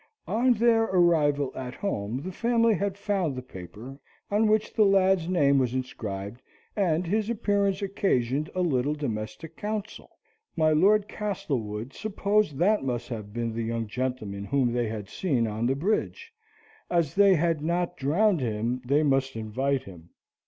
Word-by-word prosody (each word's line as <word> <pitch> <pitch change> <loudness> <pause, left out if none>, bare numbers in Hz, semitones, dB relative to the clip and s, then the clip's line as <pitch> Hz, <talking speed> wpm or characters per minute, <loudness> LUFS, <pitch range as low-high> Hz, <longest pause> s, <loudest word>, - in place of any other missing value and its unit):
On 245 +4 +3
their 225 0 +3
arrival 155 -7 +2
at 125 -1 -6
home 125 - -3
the 185 - -5
family 230 +2 +2
had 200 0 -2
found 195 -8 -1
the 130 - -6
paper 110 +6 -10 0.3
on 215 +2 +3
which 215 0 +1
the 220 - +4
lad's 190 -3 +3
name 140 -6 +3
was 130 -1 0
inscribed, 105 -3 -5 0.3
and 180 -4 +1
his 210 +5 0
appearance 200 -3 0
occasioned 150 -7 0
a 185 - 0
little 145 -3 +1
domestic 120 +3 -5
council. 215 0 -5 0.5
My 155 -1 +3
Lord 200 +6 +4
Castlewood 135 - -4
supposed 205 -6 0
that 200 +4 +2
must 120 -2 -3
have 105 -4 -6
been 115 +1 -3
the 115 - -3
young 115 0 -2
gentleman 110 -4 -4
whom 130 -1 +1
they 120 -1 0
had 110 -2 -5
seen 130 - 0
on 110 +2 -1
the 135 - +1
bridge, 205 - -2 0.6
and 175 - +1
as 160 -5 +1
they 200 -1 +5
had 165 -1 +1
not 175 +2 -1
drowned 175 +7 +2
him 120 +2 -2
they 140 +5 +2
must 135 -2 +1
invite 130 +5 -1
him. 85 -3 -13
150 Hz, 160 wpm, -27 LUFS, 120-195 Hz, 0.6 s, they